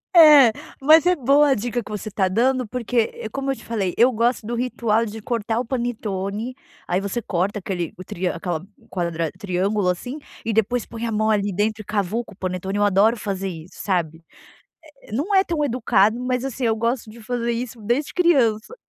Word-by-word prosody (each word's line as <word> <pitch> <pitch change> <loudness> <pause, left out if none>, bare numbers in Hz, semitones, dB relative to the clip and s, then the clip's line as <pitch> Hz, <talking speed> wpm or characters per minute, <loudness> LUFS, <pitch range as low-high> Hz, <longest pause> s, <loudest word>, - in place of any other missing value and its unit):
É, 295 -8 +9 0.3
mas 315 +5 +6
é 360 - +4
boa 285 +1 +4
a 270 - +4
dica 240 +2 -2
que - - -12
você 210 0 -5
está 190 -2 +1
dando 250 +5 +1
porque, 245 +1 -4 0.2
eh, - - -8
é - - -4
como 275 +3 -4
eu - - -2
te - - -15
falei, 200 -6 -2
eu 245 +3 +5
gosto 235 0 0
do 240 - -4
ritual 230 -2 0
de 220 +1 -7
cortar 225 -1 -1
o 250 - -2
panetone, 225 -2 -3 0.3
aí 180 +2 0
você 200 +4 -2
corta 195 +2 -1
aquele, 180 -3 -3
o 185 - -8
triâ 180 -1 -3
aquela 170 -1 -3 0.3
quadrad 170 -3 -2
triângulo, 195 +1 0
assim, 250 - -3 0.3
e 225 - 0
depois 225 +2 +1
põe 230 0 -5
a - - -2
mão 215 +1 +1
ali 205 -1 +1
dentro 215 +3 -1
e - - -12
cavuca 210 +2 -2
o - - -19
panetone, 190 +1 -3
eu 205 - +2
adoro 205 +4 +4
fazer 195 -2 -3
isso, 165 0 -10
sabe? 165 -4 -1 0.8
Eh - - -16
Eh - - -12
não 300 - -1
é 385 0 +5
tão 315 -3 -1
educado, 230 -3 +2
mas 250 0 -1
assim, 265 -1 -3
eu 225 -1 +3
gosto 230 +1 -1
de 225 +1 -12
fazer 235 +1 -2
isso 235 0 -5
desde 240 +7 -1
criança. 275 - +2
220 Hz, 210 wpm, -22 LUFS, 195-245 Hz, 0.8 s, É